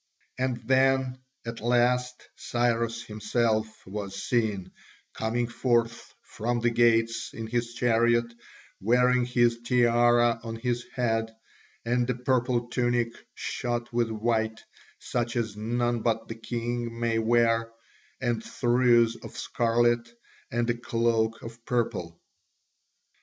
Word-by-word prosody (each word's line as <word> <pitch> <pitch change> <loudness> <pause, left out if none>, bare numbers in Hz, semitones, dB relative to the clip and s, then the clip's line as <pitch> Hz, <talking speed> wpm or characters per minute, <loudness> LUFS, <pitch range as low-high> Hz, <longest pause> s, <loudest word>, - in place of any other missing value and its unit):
And 130 -1 0
then 130 -1 +3 0.3
at 115 0 -5
last 125 +1 +1
Cyrus 115 -1 -1
himself 110 +1 0 0.2
was 100 0 -5
seen, 110 -6 0 0.4
coming 115 +2 -1
forth 115 -1 0
from 120 +2 -2
the 120 0 +1
gates 115 -1 +2
in 115 - -5
his 120 +1 -2
chariot, 120 0 +3 0.5
wearing 125 +3 +3
his 120 -1 +2
tiara 120 -1 +3
on 115 -1 -5
his 120 +1 -2
head, 115 -3 0 0.5
and 120 +1 +1
a 125 - +1
purple 125 -1 0
tunic 120 -1 +1 0.2
shot 120 0 -3
with 120 -1 +1
white, 110 0 -1 0.4
such 120 -1 -3
as 110 -4 -1
none 120 +2 -1
but 115 -1 0
the - - -5
king 120 0 -4
may 115 -1 +1
wear, 115 0 +2 0.5
and 120 -2 -1
trews 120 -2 +3
of - - -9
scarlet, 120 0 +1 0.4
and 120 0 0
a 120 - -3
cloak 115 -1 0
of 115 0 -10
purple. 110 -9 -2
120 Hz, 120 wpm, -27 LUFS, 115-120 Hz, 0.5 s, then